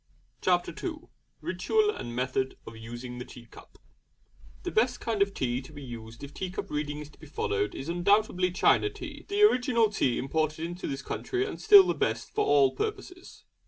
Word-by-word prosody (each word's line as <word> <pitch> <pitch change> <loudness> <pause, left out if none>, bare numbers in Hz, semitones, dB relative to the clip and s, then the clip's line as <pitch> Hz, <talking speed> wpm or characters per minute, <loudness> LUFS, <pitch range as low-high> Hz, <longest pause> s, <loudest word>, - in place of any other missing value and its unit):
CHAPTER 180 -1 +2
II 335 -1 -5 0.3
RITUAL 430 -1 +1
AND 120 - -7
METHOD 130 +1 -1
OF 115 - -9
USING 120 +2 -8
THE 125 - -6
TEA 120 -2 -12
CUP - - -16 0.9
The - - -3
best 245 +3 +2
kind 225 -3 -2
of 200 0 +3
tea 125 0 -1
to 145 +2 -11
use 115 -4 -9
if 140 +1 -8
tea 185 - -4
cup 185 - -6
reading 150 0 -3
is 150 0 -10
to - - -22
be 155 - -12
followed 105 -7 -1
is 135 - -6
undoubtedly 180 +1 +2
China 185 - +3
tea, - - -9
the 405 +1 +2
original 245 - +4
tea 130 - +1
imported 155 +3 -1
into 175 +2 -5
this 135 0 -4
country 380 +1 -2
and - - -6
still 410 -3 +9
the - - +1
best - - -2
for 430 - +1
all 140 -2 +4
purposes. 390 -4 -6
160 Hz, 190 wpm, -28 LUFS, -, 0.9 s, still